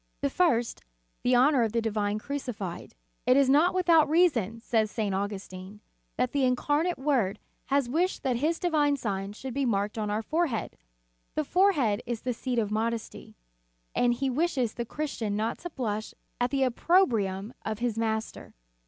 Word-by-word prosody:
The 280 - 0
first, 255 -10 +1 0.4
the 250 0 +3
honor 260 +2 +5
of 225 -2 0
the 235 - +2
Divine 210 -2 -1
Crucified. 225 -7 -5 0.3
"It 250 +1 +6
is 280 -1 +5
not 305 +7 +4
without 335 -5 +4
reason," 255 - +2
says 225 -2 +1
St. 210 -2 -2
Augustin, 195 0 -5 0.4
"that 250 0 +1
the 280 -2 +1
Incarnate 290 +7 +1
Word 255 -8 +1 0.3
has 280 -2 +1
wished 340 +9 0
that 255 -4 +1
His 315 +6 0
divine 295 -5 +2
sign 200 -4 -3
should 260 +4 -7
be 280 +2 0
marked 210 -2 0
on 210 -1 -2
our 210 +2 -1
forehead. 315 -5 -1 0.6
The 310 - +1
forehead 295 - +2
is 235 -2 -3
the 250 - -2
seat 245 +1 -3
of 215 -3 0
modesty, 225 +1 -3 0.6
and 240 -1 +2
He 270 +3 -1
wishes 260 -4 0
the 235 - -4
Christian 235 -7 -3
not 220 +2 -2
to 350 - -6
blush 215 -8 -4 0.2
at 245 0 +1
the 275 0 +1
opprobrium 235 - +1
of 215 -1 -3
his 235 -1 -1
Master. 220 -1 -3
245 Hz, 170 wpm, -28 LUFS, 215-285 Hz, 0.6 s, It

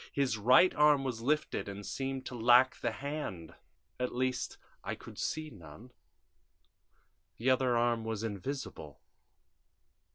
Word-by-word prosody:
His 135 -4 0
right 125 - +5
arm 150 -2 +4
was 125 -4 -3
lifted 150 -4 -1
and 100 0 -7
seemed 135 -1 -4
to - - -6
lack 120 +2 +5
the 120 - +1
hand 135 - -5 0.5
at 125 -1 -2
least, 130 0 -1 0.3
I - - -3
could - - -12
see 155 -1 -3
none. 100 - -13 1.5
The 130 +3 +2
other 130 -2 +2
arm 120 -1 +1
was 110 -1 -3
invisible. 100 - -5
125 Hz, 130 wpm, -32 LUFS, 110-135 Hz, 1.5 s, right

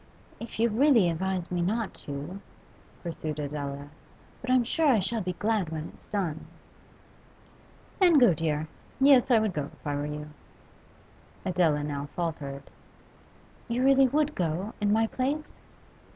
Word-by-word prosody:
'If 230 -1 -8
you 230 - +4
really 230 - +4
advise 185 +1 -2
me 175 -1 0
not 215 +4 -1
to 145 +7 -6 0.3
' - - -28
pursued 160 -3 -4
Adela. 145 -1 -4 0.5
'But 255 - -6
I'm 255 -1 +4
sure 315 +7 +1
I 250 -6 +5
shall 215 +4 -1
be 180 -1 -2
glad 210 -2 0
when 160 0 -5
it's - - -20
done.' 175 -7 -3 1.5
'Then 350 -5 +6
go, 245 -9 +6
dear. 155 -1 -1 0.3
Yes, 270 -2 +6
I 240 - +6
would 215 -3 +1
go 145 -3 -3
if - - -22
I 145 - -1
were 145 +1 -2
you.' 150 0 -6 1.1
Adela 170 -5 +2
now 145 -1 -3
faltered. 145 -5 -4 1.0
'You 240 +1 0
really 270 0 +6
would 300 +3 +1
go, 180 +4 -2
in 205 0 +2
my 225 +1 +3
place? 275 +6 -2
185 Hz, 150 wpm, -28 LUFS, 150-235 Hz, 1.5 s, Then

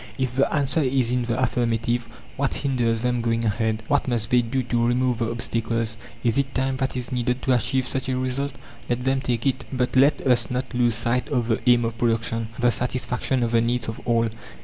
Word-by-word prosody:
If 130 -2 -2
the 135 - +2
answer 140 +1 +1
is 130 -3 +2
in 125 -1 0
the 120 +1 -1
affirmative, 120 -1 0 0.3
What 140 0 -1
hinders 120 -5 0
them 125 0 0
going 115 0 0
ahead? 110 0 0
What 145 -1 +1
must 115 -3 -1
they 125 0 +5
do 130 +3 -1
to 120 -1 +1
remove 125 0 +1
the 115 -1 0
obstacles? 115 -1 -2 0.3
Is 120 +2 +2
it 135 -1 -2
time 130 +1 0
that 130 -1 -2
is 125 -1 -4
needed 125 0 -1
to 130 - +3
achieve 130 +1 +1
such 130 0 -1
a 130 - 0
result? 130 +2 -2 0.4
Let 120 0 -1
them 135 +1 +1
take 120 -3 -1
it! 135 -1 0
But 125 -1 -1
let 140 +3 +5
us 125 -3 +2
not 130 +1 -3
lose 120 -2 +2
sight 120 +2 0
of 125 -4 0
the 110 - +2
aim 120 -1 +5
of 115 0 -4
production 115 -1 0
the 120 -1 +3
satisfaction 125 +1 0
of 115 - 0
the 115 -1 +4
needs 120 0 0
of 110 - -5
all. 115 -1 +2
125 Hz, 215 wpm, -24 LUFS, 115-130 Hz, 0.4 s, they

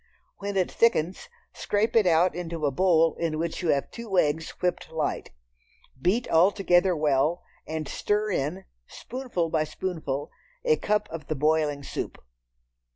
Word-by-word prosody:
When 200 0 -3
it 185 - +1
thickens 210 - +1 0.2
scrape 210 +3 0
it 215 -4 +5
out 175 +2 +4
into 165 -3 -4
a 140 - +2
bowl 165 +1 +3
in 165 -2 -1
which 165 +2 -3
you 175 - -1
have 140 -2 +1
two 225 -5 -4
eggs 160 0 +2
whipped 180 0 -1
light. 160 -2 -2 0.7
Beat 215 - +1
all 170 +4 +5
together 185 -2 +3
well, 150 +2 +1 0.2
and 155 -1 -3
stir 210 +6 0
in, 175 +4 -2 0.2
spoonful 235 -11 -4
by 155 - +2
spoonful, 155 -4 -4 0.3
a 465 -2 +4
cupful 210 - -1
of 155 -3 -7
the 155 - -1
boiling 150 0 +1
soup. - - -5
170 Hz, 155 wpm, -26 LUFS, 155-195 Hz, 0.7 s, it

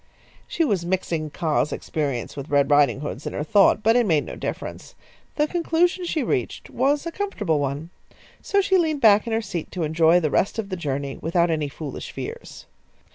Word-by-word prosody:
She 335 - 0
was 200 - 0
mixing 170 -3 -2
Kaa's 150 -2 0
experience 140 -7 -3
with 140 +1 -7
Red 145 0 +2
Riding 145 -1 +4
hood's 145 -1 -5
in - - -4
her - - -2
thought, 200 +5 +4
but 225 +2 +4
it 240 -3 +3
made 155 -5 +2
no - - -7
difference. - - -6 0.4
The 300 - +2
conclusion 345 +2 +1
she 320 -4 -1
reached 385 - -2
was 285 +3 +1
a 335 - -3
comfortable 215 - -1
one. 145 +4 -3 0.5
So 400 0 +2
she 380 -1 +3
leaned 310 -4 0
back 215 0 +5
in 230 - -2
her 225 0 0
seat 180 -5 -5
to 180 - -2
enjoy 160 +2 +4
the 155 -4 -1
rest 200 - +1
of 215 -3 -3
the 185 - -2
journey 140 -4 -3
without 170 +1 +1
any 155 -3 -1
foolish 140 0 -7
fears. - - -8
175 Hz, 195 wpm, -23 LUFS, -, 0.5 s, back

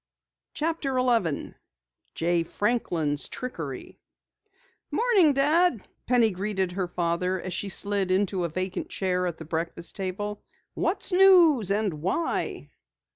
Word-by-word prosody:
CHAPTER 305 -4 -1
11 230 - 0 0.6
JAY 170 +1 +1
FRANKLIN'S 165 -8 0
TRICKERY 165 - -7 0.9
"Morning, 420 -10 +4
Dad," 295 - +2 0.2
Penny 235 -3 +3
greeted 190 -1 -2
her 185 0 -2
father 175 +1 -1
as 185 0 -5
she 200 - -3
slid 200 0 0
into 190 -1 +1
a 170 - -1
vacant 185 +3 -4
chair 180 -1 -1
at 170 - -4
the 160 - -9
breakfast 165 +1 -4
table. 205 +2 -4 0.3
"What's - - +1
news 350 - +6
and 200 -7 -1
why?" 190 - -2
195 Hz, 120 wpm, -26 LUFS, 175-250 Hz, 0.9 s, news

